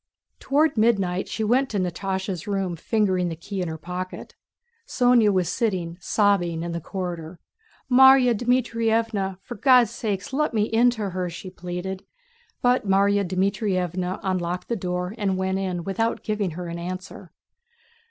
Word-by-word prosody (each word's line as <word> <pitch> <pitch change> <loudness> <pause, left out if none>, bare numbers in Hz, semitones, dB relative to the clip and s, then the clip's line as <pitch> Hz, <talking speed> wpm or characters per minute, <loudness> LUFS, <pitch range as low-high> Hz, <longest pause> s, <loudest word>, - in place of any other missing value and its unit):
Toward 295 0 +2
midnight 195 -5 +2
she 220 - -3
went 255 +5 +2
to 210 - -2
Natásha's 190 0 -3
room 195 -3 -1
fingering 185 -1 0
the 165 - -4
key 190 +4 -5
in 180 - -2
her 160 0 -5
pocket. 180 +3 -6 0.5
Sónya 245 - +4
was 185 -3 +1
sitting 180 -4 -1
sobbing 175 -6 +1
in 170 - -4
the 170 0 -4
corridor. 175 -2 -5 0.5
"Márya 265 -1 +7
Dmítrievna, 230 -4 0
for 245 - -7
God's 250 -3 +4
sake 215 -1 -4
let 300 -3 0
me 210 - +3
in 230 +3 +3
to 215 -5 -3
her!" 180 0 -2
she 185 +2 -8
pleaded, 180 +1 -5 0.6
but 245 -3 +2
Márya 200 +1 +3
Dmítrievna 185 -1 -1
unlocked 180 -2 -2
the 235 - 0
door 180 -1 -3
and 195 -2 0
went 190 0 -1
in 180 -3 -3
without 225 +5 -1
giving 210 -3 -1
her 180 - -5
an 170 0 -5
answer.... 185 0 -7
195 Hz, 150 wpm, -24 LUFS, 180-225 Hz, 0.6 s, Márya